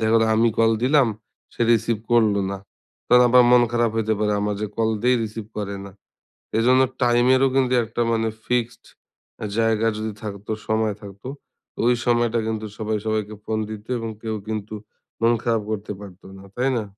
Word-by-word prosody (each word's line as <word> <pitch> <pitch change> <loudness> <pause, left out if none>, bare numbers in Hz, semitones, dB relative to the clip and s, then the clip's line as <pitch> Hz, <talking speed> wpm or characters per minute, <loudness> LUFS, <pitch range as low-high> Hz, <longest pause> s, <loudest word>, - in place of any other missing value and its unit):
দেখা 110 0 +1
গেলো 115 0 +4
আমি 115 +1 +4
কল 115 0 +4
দিলাম 135 -2 +4 0.5
সে - - -18
রিসিভ 115 0 +1 0.2
করল 110 -3 +4 0.2
না। 100 - -5 0.5
তখন 125 0 +7
আবার 125 +1 +7
মন 125 -1 +7
খারাপ 120 -1 +2
হইতে 110 -1 +1
পারে 105 -1 +1
আমার 105 0 -1
যে - - 0
কল 110 -1 +1
দেই 125 +1 +4
রিসিভ 110 -1 -7
করে 100 -1 -4
না। 100 - -12 0.7
এজন্য 125 +3 +4 0.2
টাইমেরও 125 +2 +4
কিন্তু 130 -2 +2
একটা 115 +1 -4
মানে 115 -1 +1 0.2
ফিক্সড 125 -1 -1 0.7
জায়গা 115 0 +2
যদি 110 0 -3
থাকতো, 105 0 -6 0.2
সময় 110 -2 0
থাকত, 100 -1 -12 0.5
তো - - -18
ওই 125 - +4
সময়টায় 120 -2 +1
কিন্তু 110 -1 -3
সবাই 110 0 -1
সবাইকে 110 -1 -2
ফোন 110 - -1
দিত 110 -1 -8
এবং 115 0 -4
কেউ 110 -1 -3
কিন্তু 110 -1 -4 0.5
মন 115 +1 +4
খারাপ 115 -2 +1
করতে 105 -1 -4
পারতো 95 -2 -12
না 95 - -13
তাই 130 +2 +1
না? 115 - -1
110 Hz, 180 wpm, -22 LUFS, 110-120 Hz, 0.7 s, তখন